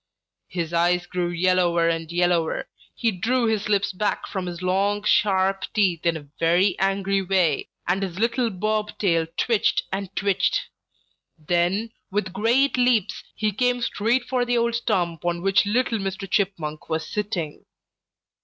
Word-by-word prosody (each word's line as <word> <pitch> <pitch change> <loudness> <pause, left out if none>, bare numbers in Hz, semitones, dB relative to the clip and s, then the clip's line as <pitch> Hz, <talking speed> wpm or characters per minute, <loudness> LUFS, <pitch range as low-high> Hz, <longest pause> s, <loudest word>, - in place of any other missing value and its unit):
His 170 -2 -4
eyes 175 +1 +2
grew 175 -1 -2
yellower 175 -1 +2
and 165 -1 -2
yellower, 175 -2 +1 0.3
he 230 -2 +1
drew 235 +6 0
his 215 -2 0
lips 200 -1 +1
back 205 +2 -1
from 190 -3 -4
his 175 0 -6
long, 200 +3 +1
sharp 195 -2 +2
teeth 180 -6 +2
in 165 -1 +2
a 145 - -11
very 175 +4 +3
angry 195 0 +1
way, 185 -6 +1 0.2
and 180 +3 +1
his 185 -2 -4
little 235 +2 +1
bob 215 +2 -2
tail 165 -5 +1
twitched 230 -4 +2
and 195 0 -3
twitched. 200 - +1 0.8
Then, 175 +7 0 0.2
with 190 -2 -2
great 240 +8 +2
leaps, 245 -5 +2
he 215 -1 0
came 245 +4 +1
straight 235 +4 +1
for 250 0 0
the 245 0 +1
old 235 0 +1
stump 175 -8 -1
on 175 0 -1
which 195 +1 +3
little 230 +1 +1
Mr. 195 0 -4
Chipmunk 175 -7 -2
was 160 0 -1
sitting. 195 -8 -4
195 Hz, 155 wpm, -24 LUFS, 175-215 Hz, 0.8 s, very